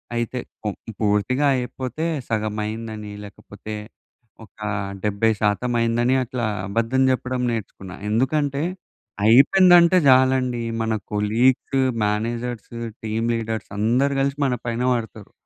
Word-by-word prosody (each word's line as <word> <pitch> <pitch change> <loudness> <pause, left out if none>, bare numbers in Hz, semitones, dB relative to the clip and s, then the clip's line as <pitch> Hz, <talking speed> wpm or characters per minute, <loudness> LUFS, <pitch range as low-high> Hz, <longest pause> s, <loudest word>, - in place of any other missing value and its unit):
అయితే 120 +2 -2 0.6
పూర్తిగా 110 +7 +1
అయిపోతే 130 +4 -4 0.2
సగమైందని, 110 0 -3
లేకపోతే 105 +1 -10 0.7
ఒక 110 - -29 0.4
70% 105 +2 +1
అయిందని 120 +3 +2
అట్లా 125 -1 -3 0.2
అబద్ధం 115 +5 0
చెప్పడం 130 0 -2
నేర్చుకున్నా. 95 -4 -6
ఎందుకంటే, 140 +5 0 0.6
అయిపోయిందంటే 175 - +6
చాలండి 130 -2 +3 0.2
మన 110 0 0 0.2
కొలీగ్స్, 120 +6 +2 0.3
మేనేజర్సు, 115 +2 -3 0.2
టీమ్ 110 +1 -1
లీడర్స్ 115 -1 -4
అందరూ 125 +6 +2
కలిసి 140 +1 -1
మన 125 -2 +1
పైన 115 +1 -2
పడతారు. 110 -3 -5
115 Hz, 95 wpm, -22 LUFS, 110-130 Hz, 0.7 s, అయిపోయిందంటే